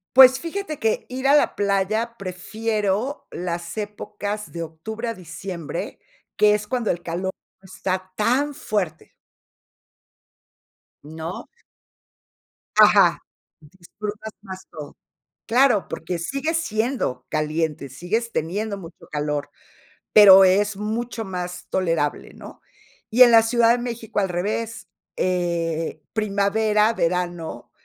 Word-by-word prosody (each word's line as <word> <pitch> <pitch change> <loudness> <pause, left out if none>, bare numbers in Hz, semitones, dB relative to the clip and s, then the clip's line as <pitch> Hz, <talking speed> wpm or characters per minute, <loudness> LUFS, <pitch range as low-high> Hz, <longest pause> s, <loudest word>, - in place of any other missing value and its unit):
Pues 260 0 +9
fíjate 335 -2 -5
que 220 -1 0
ir 260 +1 -2
a 280 - +6
la 295 - +3
playa 205 +4 0
prefiero 210 +5 -2
las 170 +1 -5
épocas 210 0 -5
de 170 -1 -4
octubre 220 +9 -6
a 230 - -1
diciembre, 170 -2 -6 0.4
que 210 0 +5
es 210 0 -4
cuando 240 -1 -1
el 175 0 -1
calor 180 +3 -3 0.3
no - - -20
está 185 0 -3
tan 260 +8 +1
fuerte. 200 - -3 1.9
¿No? 160 +3 -7 1.3
Ajá. - - +6 0.4
Disfrutas 205 +7 -8
más 190 -2 -9
todo. 150 -2 -9 0.5
Claro, 245 -4 +3
porque 170 +2 -4
sigue 275 - -2
siendo 230 - -1
caliente. 155 -2 -2
Sigues 210 - -2
teniendo 200 +6 -2
mucho 170 -2 -12
calor, 150 -1 -2 0.6
pero 195 -2 +9
es 200 +2 +3
mucho 225 +3 -3
más 180 -2 -5
tolerable, 165 -6 -1
¿no? - - -12 0.5
Y 245 +3 +7
en 245 - +8
la 225 -1 +7
Ciudad 230 0 +3
de 245 - +1
México 235 -3 -5
al 195 - 0
revés, 215 +6 -3 0.3
eh, 170 -3 -1
primavera, 215 +1 +2
verano, 175 - -2
200 Hz, 115 wpm, -23 LUFS, 175-225 Hz, 1.9 s, Pues